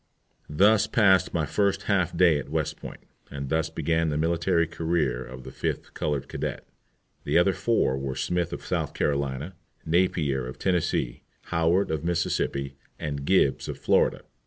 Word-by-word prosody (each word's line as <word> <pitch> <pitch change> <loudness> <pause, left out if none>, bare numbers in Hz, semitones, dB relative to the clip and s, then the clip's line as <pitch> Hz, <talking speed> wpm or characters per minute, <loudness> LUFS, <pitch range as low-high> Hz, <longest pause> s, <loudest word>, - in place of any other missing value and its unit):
Thus 105 +8 +4
passed 95 -6 +4
my 80 -3 0
first 100 +3 0
half 95 -5 0
day 85 -5 +5
at 70 - -8
West 80 -1 -1
Point, - - -9 0.3
and 70 -1 -6
thus 80 +1 0
began 80 +1 0
the 75 - -1
military 85 +2 +1
career 80 -6 -1
of 65 +1 -10
the - - -9
fifth - - -4
colored 75 -3 -2
cadet. - - -5 0.6
The - - +1
other 90 +2 +4
four 110 - +1
were 65 -1 -4
Smith 85 +5 -1
of - - -7
South - - -2
Carolina, 70 +3 -1 0.3
Napier 80 -6 +1
of 65 - -8
Tennessee, 90 -9 0 0.3
Howard 85 +3 +2
of 80 -1 -2
Mississippi, 80 -5 -1 0.2
and 70 -2 -4
Gibbs 75 -6 +2
of - - -4
Florida. - - +2
80 Hz, 160 wpm, -26 LUFS, 70-90 Hz, 0.6 s, day